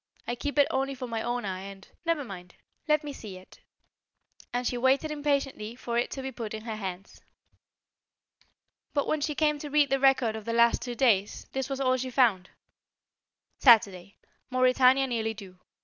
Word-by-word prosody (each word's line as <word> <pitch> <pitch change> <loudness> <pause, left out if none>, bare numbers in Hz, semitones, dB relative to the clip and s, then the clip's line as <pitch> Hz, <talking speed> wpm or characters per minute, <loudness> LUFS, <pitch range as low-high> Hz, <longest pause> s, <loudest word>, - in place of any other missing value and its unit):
I 240 - -1
keep 285 +4 -4
it 285 - +5
only 270 +1 -1
for 255 -1 -6
my 230 -2 -3
own 240 -1 -2
eye, 185 -1 -4
and 195 0 -10
" - - -44
"Never 330 -3 +1
mind; 180 -6 -10 0.3
let 305 0 +2
me 290 -1 -6
see 205 -7 -9
it." 185 - -17 0.9
And 245 +1 -2
she 245 - -1
waited 265 +5 +2
impatiently 280 -7 -2
for 240 -1 -5
it 240 - +1
to 270 - -6
be 265 - -4
put 225 -3 -6
in 215 - -8
her 225 -1 -5
hands. 190 -1 -7 1.7
But 285 - +1
when 310 - -1
she 300 0 -1
came 300 -1 +1
to 295 - -6
read 290 -1 +3
the 270 - +2
record 260 -4 +3
of 220 -1 -7
the 230 - -2
last 235 0 +4
two 245 -1 -5
days, 210 -6 +1
this 265 +1 -3
was 270 -1 -3
all 255 -1 +2
she 255 0 -4
found: 230 -8 +2 1.1
Saturday: 200 -6 +4 0.3
Mauretania 255 +1 +4
nearly 225 -3 -2
due. 190 -3 -12
245 Hz, 190 wpm, -28 LUFS, 220-275 Hz, 1.7 s, it